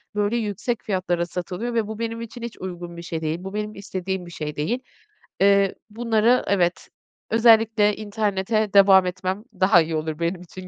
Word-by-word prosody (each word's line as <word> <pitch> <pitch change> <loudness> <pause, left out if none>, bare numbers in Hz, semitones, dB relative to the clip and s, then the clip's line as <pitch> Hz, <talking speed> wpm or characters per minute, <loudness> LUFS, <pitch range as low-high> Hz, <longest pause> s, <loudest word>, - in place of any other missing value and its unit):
böyle, 205 +2 +1
yüksek 220 +2 -2
fiyatlara 180 -3 -1
satılıyor 180 +7 -4
ve 225 -2 0
bu 220 0 -6
benim 230 0 -3
için 230 +1 -8
hiç 235 -1 -6
uygun 175 -2 -7
bir - - -6
şey 165 -1 -5
değil. 155 +1 -1
Bu 190 +1 -7
benim 210 0 -4
istediğim 190 -1 -4
bir 175 - -11
şey 150 -2 -5
değil. 200 +13 -1 0.6
Eee, 200 -1 +4
bunları 230 +2 +2
evet, 180 -3 +1 0.4
özellikle 225 -2 +4
internete 210 0 -1
devam 195 -1 +7
etmem 185 +2 -3 0.2
daha 185 -2 +6
iyi 160 0 -2
olur 155 0 -3
benim 170 +1 -1
için 185 +1 -10
195 Hz, 175 wpm, -23 LUFS, 180-220 Hz, 0.6 s, devam